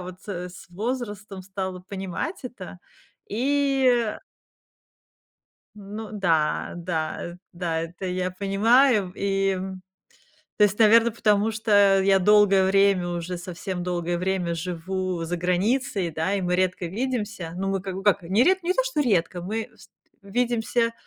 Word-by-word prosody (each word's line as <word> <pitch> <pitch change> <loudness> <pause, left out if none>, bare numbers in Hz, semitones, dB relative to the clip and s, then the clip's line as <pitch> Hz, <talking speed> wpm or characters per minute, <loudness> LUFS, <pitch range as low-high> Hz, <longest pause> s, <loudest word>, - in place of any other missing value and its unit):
вот, 180 0 -10
э, 180 -2 -4
с 180 - -12
возрастом 210 -1 -4
стала 190 -1 -5
понимать 190 - -5
это, 205 -7 -8 0.5
и, 275 +4 +1 0.3
э - - -14 1.6
Ну 210 +1 -8
да, 165 -7 +1
да, 170 -1 -3 0.2
да, 170 -2 -2
это 175 +3 -6
я 180 0 -1
понимаю. 205 +2 +3
И, 195 0 0
м, 190 0 -4 0.7
то 210 - +5
есть, 205 0 +1
наверно, 230 +1 +6
потому 210 -1 +2
что 205 -3 +4
я 195 0 +4
долгое 200 0 +5
время 195 -2 +3
уже, 175 +1 -4
совсем 180 +1 -5
долгое 175 -1 -2
время 180 -1 -1
живу 180 +1 -3
за 175 +2 -2
границей, 190 +3 0
да, 165 +5 -1
и 200 - 0
мы 180 -1 0
редко 185 -1 0
видимся. 210 -4 -3
Ну, 195 +1 -2
мы 195 0 0
как 190 -1 -5
бы 195 - -5
как 200 -1 +3
не 190 +7 +2
ред 380 +3 +3
не 350 +2 +1
то - - +1
что - - -1
редко, 185 - +1
мы 220 +5 -3
вст - - -18 0.3
видимся, 230 +2 0
195 Hz, 150 wpm, -25 LUFS, 180-215 Hz, 1.6 s, наверно